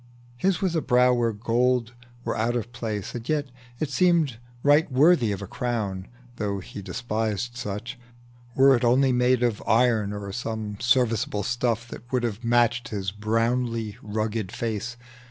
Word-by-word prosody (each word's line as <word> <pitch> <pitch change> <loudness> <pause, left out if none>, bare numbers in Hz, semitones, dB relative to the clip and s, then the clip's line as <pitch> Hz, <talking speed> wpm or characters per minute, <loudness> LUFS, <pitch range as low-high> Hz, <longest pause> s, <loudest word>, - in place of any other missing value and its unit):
His 190 +10 0
was 180 -3 +1
a 160 - +2
brow 125 -2 +4
where 120 -2 +1
gold 120 +2 +1 0.3
were - - -1
out 115 +2 0
of 120 0 -3
place, 110 -4 -4
And 120 -1 -7
yet 145 -3 0 0.3
it 150 -2 -2
seemed 160 -5 +2 0.2
right 145 +1 +4
worthy 135 -4 +4
of 100 0 -4
a - - -6
crown, 105 -6 -3 0.3
(Though 100 -2 -1
he 100 +1 -8
despised 110 +2 -3
such,) 120 +3 -5 0.6
were 135 0 +6
it 120 - -1
only 130 +3 +4
made 125 0 +3
Of 120 -3 0
iron, 110 -3 +3
or 100 -1 -5
some 110 -2 -4
serviceable 120 -4 +1
stuff 120 0 -1
That 120 +1 -11
would 125 -2 +1
have 115 0 -3
matched 120 0 +2
his 95 -3 -3
sinewy, 115 -1 0
brown 110 0 -2
face. 115 +3 -4
120 Hz, 160 wpm, -25 LUFS, 110-125 Hz, 0.6 s, were